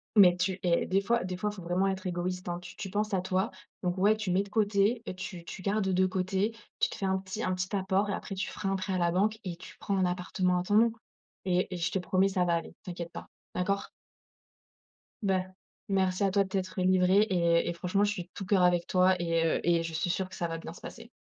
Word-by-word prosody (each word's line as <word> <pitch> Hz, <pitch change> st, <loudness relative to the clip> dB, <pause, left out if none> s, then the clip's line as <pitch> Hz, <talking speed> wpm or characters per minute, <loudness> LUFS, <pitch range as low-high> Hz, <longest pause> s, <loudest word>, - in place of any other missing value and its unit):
Mais 185 Hz, -4 st, +8 dB
tu 185 Hz, +1 st, -1 dB
et 175 Hz, -2 st, +2 dB
des 195 Hz, +1 st, +2 dB
fois 235 Hz, +2 st, +1 dB
des 185 Hz, 0 st, -4 dB
fois, 210 Hz, +3 st, -1 dB
il -, -, -11 dB
faut 190 Hz, -, -9 dB
vraiment 180 Hz, +3 st, +1 dB
être 190 Hz, 0 st, -2 dB
égoïste, 180 Hz, +1 st, -3 dB
hein. 175 Hz, 0 st, -2 dB
Tu 180 Hz, -, -11 dB
tu 195 Hz, -, -6 dB
penses 210 Hz, +2 st, -1 dB
à 190 Hz, -, +2 dB
toi, 185 Hz, +2 st, 0 dB, 0.3 s
donc 180 Hz, 0 st, 0 dB
ouais, 205 Hz, +3 st, +4 dB
tu 210 Hz, -4 st, -3 dB
mets 185 Hz, +2 st, +3 dB
de 200 Hz, -, -13 dB
côté 210 Hz, +2 st, +2 dB
et 185 Hz, -, -5 dB
tu 185 Hz, -1 st, -7 dB
tu 175 Hz, -, -8 dB
gardes 200 Hz, +1 st, 0 dB
de 185 Hz, 0 st, +3 dB
côté, 190 Hz, +4 st, -1 dB, 0.2 s
tu -, -, +3 dB
te -, -, -7 dB
fais 195 Hz, -, -3 dB
un 190 Hz, 0 st, +2 dB
petit 190 Hz, +3 st, -5 dB
un 185 Hz, -, 0 dB
petit 185 Hz, +2 st, -2 dB
apport 195 Hz, +1 st, +1 dB
et -, -, 0 dB
après 195 Hz, -, -5 dB
tu 190 Hz, -, -2 dB
feras 195 Hz, -, -3 dB
un 195 Hz, -, +1 dB
prêt 190 Hz, 0 st, -2 dB
à -, -, +1 dB
la 175 Hz, -1 st, +2 dB
banque 210 Hz, +5 st, +1 dB
et 180 Hz, -4 st, -4 dB
tu 180 Hz, -, -12 dB
prends 200 Hz, -, -1 dB
un 190 Hz, -, +3 dB
appartement 180 Hz, 0 st, 0 dB
à -, -, -2 dB
ton 205 Hz, +3 st, 0 dB
nom 230 Hz, +2 st, +6 dB, 0.5 s
et 180 Hz, -1 st, +2 dB
et -, -, -3 dB
je 170 Hz, 0 st, -1 dB
te 190 Hz, -, 0 dB
promets, 185 Hz, +1 st, +2 dB
ça 185 Hz, -2 st, +1 dB
va 170 Hz, -1 st, +2 dB
aller, 165 Hz, -, -4 dB
t'inquiète 175 Hz, -2 st, -6 dB
pas, -, -, -8 dB, 0.3 s
d'accord? 195 Hz, +2 st, -1 dB, 1.3 s
Bah. 190 Hz, -2 st, +1 dB, 0.4 s
Merci 190 Hz, 0 st, +1 dB
à 195 Hz, -, +2 dB
toi 200 Hz, +1 st, +3 dB
de 190 Hz, -, -9 dB
t'être 185 Hz, -1 st, -2 dB
livrée 185 Hz, +1 st, +4 dB
et 170 Hz, -2 st, +2 dB
et -, -, -1 dB
franchement, 180 Hz, +4 st, 0 dB
je 205 Hz, -, +2 dB
suis 185 Hz, -4 st, -4 dB
de 175 Hz, -, -26 dB
tout 195 Hz, -, -6 dB
cœur 190 Hz, 0 st, +3 dB
avec 175 Hz, -1 st, +3 dB
toi 185 Hz, 0 st, +4 dB
et 165 Hz, -1 st, +1 dB
heu, 165 Hz, -, +2 dB
et 170 Hz, -1 st, +3 dB
je 165 Hz, 0 st, -5 dB
suis 160 Hz, +2 st, -1 dB
sûre 185 Hz, +2 st, 0 dB
que 185 Hz, -, -10 dB
ça 170 Hz, -, -2 dB
va 165 Hz, -, -3 dB
bien 165 Hz, 0 st, -8 dB
se -, -, -14 dB
passer. 230 Hz, 0 st, -9 dB
185 Hz, 270 wpm, -30 LUFS, 180-195 Hz, 1.3 s, Mais